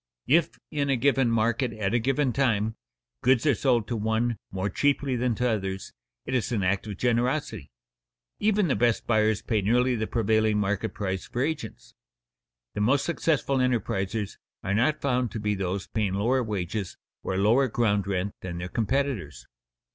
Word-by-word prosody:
If, 165 Hz, +5 st, +2 dB
in 145 Hz, -2 st, -1 dB
a 135 Hz, -, +3 dB
given 135 Hz, -1 st, +2 dB
market 115 Hz, +2 st, +1 dB
at 105 Hz, -1 st, -2 dB
a 120 Hz, -, +3 dB
given 135 Hz, +2 st, +1 dB
time, 110 Hz, -5 st, +1 dB, 0.5 s
goods 130 Hz, 0 st, +3 dB
are 145 Hz, -, +5 dB
sold 120 Hz, -1 st, +1 dB
to 120 Hz, -, -2 dB
one 110 Hz, +2 st, 0 dB
more 95 Hz, +1 st, -2 dB
cheaply 140 Hz, +5 st, +1 dB
than 120 Hz, -1 st, 0 dB
to 125 Hz, +2 st, 0 dB
others, 95 Hz, -4 st, -3 dB, 0.3 s
it 130 Hz, -, -4 dB
is 125 Hz, -1 st, 0 dB
an 105 Hz, -5 st, 0 dB
act 95 Hz, +3 st, 0 dB
of 100 Hz, -3 st, -6 dB
generosity. 125 Hz, -, 0 dB, 0.7 s
Even 210 Hz, -2 st, +2 dB
the 135 Hz, -, +1 dB
best 120 Hz, -2 st, +1 dB
buyers 110 Hz, -2 st, +2 dB
pay 110 Hz, -3 st, 0 dB
nearly 125 Hz, +5 st, +2 dB
the 110 Hz, -1 st, -2 dB
prevailing 110 Hz, -1 st, +2 dB
market 105 Hz, +1 st, -1 dB
price 95 Hz, -2 st, -3 dB
for 120 Hz, +1 st, -1 dB
agents. 145 Hz, -7 st, -5 dB, 0.8 s
The 105 Hz, -, -2 dB
most 135 Hz, +6 st, +2 dB
successful 155 Hz, -5 st, 0 dB
enterprisers 110 Hz, -4 st, -1 dB, 0.3 s
are 95 Hz, -, -1 dB
not 125 Hz, +9 st, +2 dB
found 125 Hz, -3 st, +1 dB
to 110 Hz, -, -3 dB
be 105 Hz, 0 st, 0 dB
those 95 Hz, 0 st, -2 dB
paying 105 Hz, -4 st, -1 dB
lower 120 Hz, +6 st, +2 dB
wages 100 Hz, -3 st, -3 dB, 0.2 s
or 95 Hz, -, -2 dB
lower 115 Hz, +7 st, +4 dB
ground 105 Hz, -4 st, +1 dB
rent 100 Hz, 0 st, -1 dB
than 90 Hz, -2 st, -5 dB
their 90 Hz, +1 st, -5 dB
competitors. 110 Hz, -, -2 dB
115 Hz, 170 wpm, -26 LUFS, 100-130 Hz, 0.8 s, are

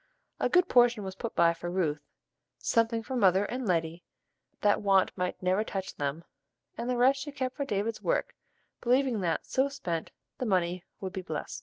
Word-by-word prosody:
A -, -, +1 dB
good 360 Hz, 0 st, +4 dB
portion 240 Hz, -, +4 dB
was 190 Hz, -1 st, -5 dB
put 225 Hz, +4 st, -6 dB
by 170 Hz, 0 st, +5 dB
for 170 Hz, +1 st, -6 dB
Ruth, 160 Hz, -5 st, 0 dB, 0.6 s
something 230 Hz, 0 st, +1 dB
for 260 Hz, -, -5 dB
"mother 195 Hz, -3 st, +4 dB
and 250 Hz, +2 st, -4 dB
Letty" 165 Hz, -1 st, 0 dB, 0.6 s
that 205 Hz, -1 st, +3 dB
want 195 Hz, -2 st, +3 dB
might 180 Hz, 0 st, -3 dB
never 185 Hz, +3 st, +2 dB
touch 195 Hz, -3 st, -4 dB
them, 145 Hz, +3 st, -3 dB, 0.5 s
and 235 Hz, +2 st, -4 dB
the 250 Hz, -, 0 dB
rest 265 Hz, +3 st, +4 dB
she 290 Hz, -, -5 dB
kept 260 Hz, -2 st, -3 dB
for 280 Hz, -, -2 dB
David's 215 Hz, -1 st, -2 dB
work, -, -, 0 dB, 0.5 s
believing 250 Hz, -2 st, +2 dB
that, 170 Hz, -3 st, -1 dB
so 270 Hz, +1 st, +1 dB
spent, 175 Hz, -, -4 dB, 0.3 s
the 255 Hz, -, -1 dB
money 180 Hz, -2 st, +1 dB, 0.2 s
would 190 Hz, -1 st, -4 dB
be 190 Hz, -, -3 dB
blest. 160 Hz, -4 st, -5 dB
200 Hz, 185 wpm, -29 LUFS, 180-245 Hz, 0.6 s, by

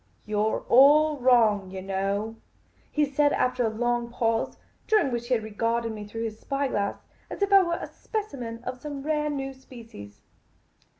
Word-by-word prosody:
" -, -, -38 dB
You 210 Hz, -1 st, -2 dB
're 215 Hz, +1 st, 0 dB
all 295 Hz, +4 st, +5 dB
wrong, 225 Hz, -6 st, +4 dB
yah 190 Hz, 0 st, -6 dB
know," 195 Hz, +3 st, -2 dB, 0.5 s
he 300 Hz, -1 st, +2 dB
said, 290 Hz, +1 st, +2 dB
after 250 Hz, -1 st, +1 dB
a 225 Hz, -, +2 dB
long 240 Hz, +1 st, -1 dB
pause, 230 Hz, -1 st, -1 dB, 0.3 s
during 425 Hz, -11 st, +3 dB
which 240 Hz, 0 st, -3 dB
he 255 Hz, -, +3 dB
had 220 Hz, -, -2 dB
regarded 230 Hz, +2 st, -1 dB
me 210 Hz, -1 st, -7 dB
through 225 Hz, +2 st, -5 dB
his 220 Hz, -1 st, -6 dB
eye 275 Hz, 0 st, +1 dB
glass 200 Hz, -3 st, -2 dB, 0.3 s
as -, -, -3 dB
if 400 Hz, 0 st, +1 dB
I 390 Hz, -, +9 dB
were 340 Hz, -2 st, 0 dB
a -, -, -5 dB
specimen 250 Hz, -, -6 dB
of 250 Hz, 0 st, -6 dB
some 285 Hz, -2 st, -6 dB
rare 300 Hz, 0 st, 0 dB
new 270 Hz, -2 st, -3 dB
species. 230 Hz, -, -13 dB
240 Hz, 185 wpm, -26 LUFS, 220-280 Hz, 0.5 s, I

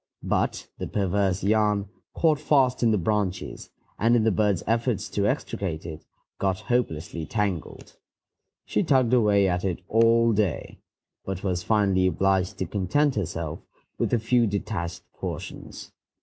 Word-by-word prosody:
But -, -, -1 dB
the -, -, -3 dB
perverse 95 Hz, -1 st, 0 dB
yarn 105 Hz, -1 st, +2 dB, 0.3 s
caught 155 Hz, -3 st, +3 dB
fast 135 Hz, -4 st, +2 dB
in 120 Hz, -, +4 dB
the 110 Hz, -, +3 dB
branches, 95 Hz, 0 st, -2 dB, 0.3 s
and, 115 Hz, +3 st, +4 dB
in 115 Hz, -, +3 dB
the 110 Hz, -, +3 dB
bird's 105 Hz, -3 st, +1 dB
efforts 115 Hz, -1 st, 0 dB
to 100 Hz, 0 st, 0 dB
extricate 85 Hz, -6 st, -3 dB
it, 80 Hz, -2 st, -7 dB, 0.4 s
got 95 Hz, -1 st, 0 dB
hopelessly 85 Hz, -, -2 dB
tangled. 100 Hz, -4 st, -3 dB, 0.7 s
She -, -, 0 dB
tugged 130 Hz, -3 st, +2 dB
away 105 Hz, -5 st, +4 dB
at 90 Hz, -1 st, -1 dB
it 90 Hz, -2 st, -2 dB
all 115 Hz, +1 st, +4 dB
day, 100 Hz, -8 st, -1 dB, 0.4 s
but 95 Hz, -1 st, -5 dB
was 90 Hz, -3 st, -1 dB
finally 95 Hz, -2 st, +2 dB
obliged 95 Hz, 0 st, +1 dB
to 95 Hz, -, -2 dB
content 105 Hz, -, +1 dB
herself 85 Hz, -6 st, -3 dB, 0.4 s
with -, -, 0 dB
a 120 Hz, -, +3 dB
few 115 Hz, +1 st, +2 dB
detached 95 Hz, -4 st, -3 dB
portions. -, -, -7 dB
100 Hz, 145 wpm, -25 LUFS, 95-115 Hz, 0.7 s, in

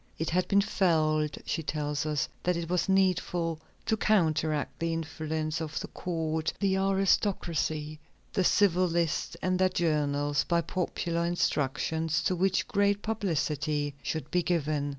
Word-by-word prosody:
"It 160 Hz, -, -2 dB
had 180 Hz, +2 st, +1 dB
been 200 Hz, 0 st, +4 dB
felt," 155 Hz, -7 st, +1 dB
she 165 Hz, -, -1 dB
tells 150 Hz, -1 st, -2 dB
us, 150 Hz, -2 st, 0 dB
"that 180 Hz, -1 st, +1 dB
it 170 Hz, 0 st, -4 dB
was 180 Hz, +2 st, +1 dB
needful 180 Hz, -4 st, +1 dB, 0.3 s
to 220 Hz, -, +2 dB
counteract 155 Hz, -8 st, +1 dB
the 165 Hz, 0 st, 0 dB
influence 160 Hz, 0 st, -3 dB
of 155 Hz, -1 st, -3 dB
the -, -, -6 dB
court, 160 Hz, -2 st, -2 dB
the 195 Hz, -2 st, +2 dB
aristocracy, 180 Hz, -6 st, 0 dB, 0.3 s
the 190 Hz, -, +2 dB
civil 185 Hz, -1 st, +4 dB
list 170 Hz, -2 st, -1 dB
and 185 Hz, 0 st, +1 dB
their 185 Hz, 0 st, +4 dB
journals, 145 Hz, -4 st, +1 dB
by 170 Hz, 0 st, +1 dB
popular 170 Hz, -1 st, -2 dB
instructions 160 Hz, -1 st, 0 dB
to 185 Hz, -, +1 dB
which 190 Hz, +1 st, +1 dB
great 200 Hz, 0 st, +1 dB
publicity 155 Hz, -8 st, -1 dB
should 155 Hz, -2 st, -4 dB
be 180 Hz, -, +3 dB
given. 155 Hz, -4 st, 0 dB
165 Hz, 145 wpm, -29 LUFS, 155-185 Hz, 0.3 s, been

